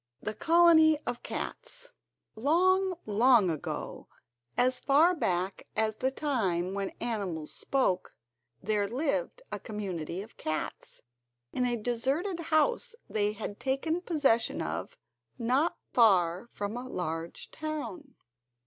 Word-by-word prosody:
The 215 Hz, -, -4 dB
Colony 320 Hz, +2 st, +6 dB
Of 240 Hz, -, -3 dB
Cats -, -, -5 dB, 0.4 s
Long, 365 Hz, -, +3 dB
long 215 Hz, -2 st, +5 dB
ago, 155 Hz, -, -5 dB, 0.5 s
as 255 Hz, +1 st, +3 dB
far 310 Hz, +6 st, +5 dB
back 185 Hz, -, -1 dB
as 220 Hz, 0 st, +1 dB
the 260 Hz, -, +1 dB
time 195 Hz, -, -1 dB
when 200 Hz, -1 st, -2 dB
animals 195 Hz, -10 st, -3 dB
spoke, 255 Hz, -10 st, 0 dB, 0.5 s
there 210 Hz, -1 st, +1 dB
lived 305 Hz, -, -2 dB
a -, -, -3 dB
community 190 Hz, -5 st, -4 dB
of 220 Hz, -, -16 dB
cats 155 Hz, 0 st, -4 dB, 0.5 s
in 250 Hz, -1 st, +1 dB
a 240 Hz, -, +1 dB
deserted 265 Hz, -, -1 dB
house 335 Hz, +10 st, +1 dB
they 210 Hz, -1 st, 0 dB
had 210 Hz, -1 st, -6 dB
taken 295 Hz, +6 st, -1 dB
possession 290 Hz, -10 st, +2 dB
of -, -, -4 dB, 0.4 s
not 260 Hz, +7 st, +1 dB, 0.2 s
far 190 Hz, -2 st, +4 dB
from 205 Hz, +2 st, -4 dB
a 255 Hz, +1 st, -6 dB
large 165 Hz, -3 st, -4 dB
town. 310 Hz, -1 st, -5 dB
245 Hz, 120 wpm, -30 LUFS, 200-310 Hz, 0.5 s, Colony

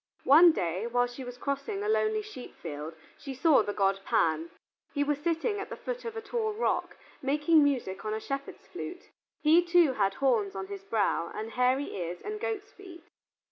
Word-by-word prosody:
One 330 Hz, +5 st, +8 dB
day 185 Hz, -, -2 dB
while 245 Hz, +1 st, +2 dB
she 245 Hz, +2 st, -8 dB
was 245 Hz, 0 st, -8 dB
crossing 280 Hz, -, -3 dB
a -, -, -2 dB
lonely 435 Hz, 0 st, +1 dB
sheep 405 Hz, -13 st, -10 dB
field 155 Hz, 0 st, -7 dB, 0.2 s
she 275 Hz, -2 st, -7 dB
saw 300 Hz, +2 st, +5 dB
the 205 Hz, -, -2 dB
god 195 Hz, -1 st, +1 dB
Pan: 160 Hz, -1 st, +1 dB, 0.5 s
he 285 Hz, -, +2 dB
was 290 Hz, 0 st, 0 dB
sitting 340 Hz, +7 st, -1 dB
at 400 Hz, -, -6 dB
the -, -, -5 dB
foot -, -, -5 dB
of 455 Hz, -1 st, -5 dB
a -, -, -3 dB
tall 440 Hz, 0 st, -2 dB
rock, 445 Hz, -, -1 dB, 0.2 s
making 295 Hz, +3 st, +4 dB
music 250 Hz, -10 st, -1 dB
on 215 Hz, -, -3 dB
a -, -, -3 dB
shepherd's 275 Hz, +4 st, -6 dB
flute. 360 Hz, +2 st, -8 dB, 0.3 s
He 320 Hz, +3 st, +6 dB
too 340 Hz, -5 st, +4 dB
had 195 Hz, -4 st, +1 dB
horns 225 Hz, -8 st, +1 dB
on 190 Hz, 0 st, -4 dB
his 200 Hz, 0 st, -8 dB
brow, 200 Hz, -5 st, 0 dB
and 220 Hz, +1 st, -5 dB
hairy 255 Hz, +3 st, +1 dB
ears, 175 Hz, -1 st, -4 dB
and 425 Hz, 0 st, -5 dB
goat's 430 Hz, -1 st, -4 dB
feet. 350 Hz, -4 st, -13 dB
275 Hz, 195 wpm, -29 LUFS, -, 0.5 s, One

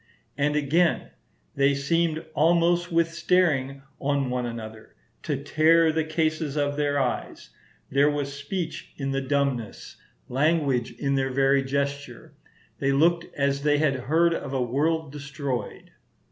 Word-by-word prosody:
And 150 Hz, +1 st, 0 dB
again, 155 Hz, +4 st, +1 dB, 0.4 s
"They 140 Hz, 0 st, +2 dB
seemed 160 Hz, +3 st, 0 dB
almost, 170 Hz, +2 st, +2 dB
with 165 Hz, 0 st, +1 dB
staring 155 Hz, -6 st, +1 dB, 0.2 s
on 140 Hz, -2 st, 0 dB
one 125 Hz, -1 st, -1 dB
another, 110 Hz, -2 st, -9 dB, 0.3 s
to 145 Hz, -, -2 dB
tear 160 Hz, +2 st, +4 dB
the 160 Hz, 0 st, 0 dB
cases 155 Hz, -1 st, -1 dB
of 145 Hz, 0 st, 0 dB
their 145 Hz, -1 st, 0 dB
eyes; 125 Hz, -, -3 dB, 0.4 s
there 140 Hz, +2 st, +4 dB
was 145 Hz, -1 st, -3 dB
speech 160 Hz, +4 st, -5 dB
in 135 Hz, -1 st, -3 dB
the 135 Hz, 0 st, -1 dB
dumbness, 135 Hz, -4 st, -2 dB, 0.3 s
language 140 Hz, -3 st, +1 dB
in 140 Hz, -1 st, -2 dB
their 135 Hz, -1 st, 0 dB
very 135 Hz, +1 st, +2 dB
gesture; 140 Hz, -2 st, -4 dB, 0.5 s
they 140 Hz, 0 st, +1 dB
looked 165 Hz, +4 st, +2 dB
as 140 Hz, 0 st, 0 dB
they 145 Hz, 0 st, +2 dB
had 150 Hz, -2 st, +2 dB
heard 160 Hz, +6 st, +2 dB
of 140 Hz, -, -5 dB
a 130 Hz, -, 0 dB
world 150 Hz, +5 st, 0 dB
destroyed." 140 Hz, -3 st, -5 dB
145 Hz, 140 wpm, -25 LUFS, 135-160 Hz, 0.5 s, tear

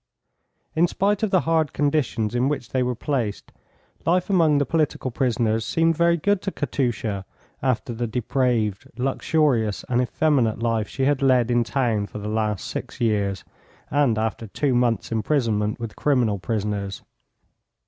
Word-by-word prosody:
In 170 Hz, +2 st, +4 dB
spite 200 Hz, +3 st, 0 dB
of 220 Hz, -, +1 dB
the 185 Hz, -2 st, +3 dB
hard 160 Hz, -2 st, +1 dB
conditions 140 Hz, -7 st, 0 dB
in 125 Hz, +2 st, +1 dB
which 135 Hz, -5 st, -3 dB
they 130 Hz, -, 0 dB
were 125 Hz, 0 st, 0 dB
placed, 120 Hz, -5 st, -3 dB, 0.5 s
life 180 Hz, +3 st, +1 dB
among 160 Hz, -6 st, +4 dB
the 145 Hz, -, +2 dB
political 155 Hz, -5 st, 0 dB
prisoners 115 Hz, -3 st, 0 dB
seemed 165 Hz, +8 st, +2 dB
very 170 Hz, +1 st, +3 dB
good 205 Hz, +4 st, +1 dB
to 195 Hz, -, -3 dB
Katusha 120 Hz, -, -2 dB, 0.4 s
after 125 Hz, -2 st, -1 dB
the 120 Hz, +1 st, -2 dB
depraved, 120 Hz, -3 st, 0 dB
luxurious 130 Hz, -4 st, +1 dB
and 125 Hz, 0 st, +2 dB
effeminate 125 Hz, -3 st, +1 dB
life 115 Hz, -1 st, 0 dB
she 135 Hz, -, -3 dB
had 140 Hz, -1 st, +2 dB
led 125 Hz, -3 st, +3 dB
in 120 Hz, 0 st, +3 dB
town 115 Hz, -4 st, 0 dB
for -, -, -9 dB
the 105 Hz, 0 st, -5 dB
last 105 Hz, -2 st, -1 dB
six -, -, -6 dB
years, 100 Hz, -4 st, 0 dB, 0.5 s
and 140 Hz, -6 st, +2 dB
after 110 Hz, 0 st, -2 dB
two 135 Hz, +6 st, 0 dB
months' 120 Hz, -4 st, +1 dB
imprisonment 110 Hz, -3 st, 0 dB
with 115 Hz, -2 st, -6 dB
criminal 120 Hz, -8 st, +1 dB
prisoners. 100 Hz, -1 st, -3 dB
125 Hz, 155 wpm, -23 LUFS, 110-145 Hz, 0.5 s, In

